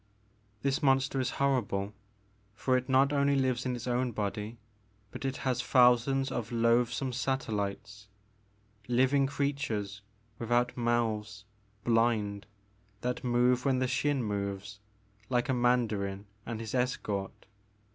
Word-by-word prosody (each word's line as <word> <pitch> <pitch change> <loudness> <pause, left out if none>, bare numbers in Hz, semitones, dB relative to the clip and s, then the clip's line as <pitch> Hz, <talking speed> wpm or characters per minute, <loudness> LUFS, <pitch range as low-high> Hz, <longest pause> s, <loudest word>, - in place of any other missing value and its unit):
This 140 +3 +1
monster 135 -1 +2
is 130 - 0
horrible, 110 -7 0 0.6
for 130 +3 +1
it 130 +1 -1
not 135 +2 +4
only 140 0 +3
lives 130 -1 0
in 125 - -1
its 120 - -6
The 125 - -1
Maker 120 - +1
of 130 - +1
Moons. 120 - -4
7 105 - -1
1 - - +2
own - - +1
body, 105 +2 -6 0.5
but - - -6
it 135 0 -2
has 125 -2 -1
thousands 130 +2 +4
of 120 -3 -3
loathsome 120 +2 +2
satellites, 105 -6 -3 0.4
— 105 +1 -32
^living 130 +3 +3
creatures 135 -8 -2 0.4
without 120 +1 +1
mouths, 110 -3 -1 0.4
blind, 115 -3 +1 0.5
that 125 0 -2
move 125 0 +2
when 135 -2 +2
the 130 - +1
Xin 135 +1 0
moves, 100 -1 -4 0.5
like 125 +1 +1
a - - +3
mandarin 110 -6 +1 0.2
and 115 -2 -4
his 110 -2 -6
escort. 110 -6 -2
120 Hz, 145 wpm, -30 LUFS, 105-130 Hz, 0.6 s, not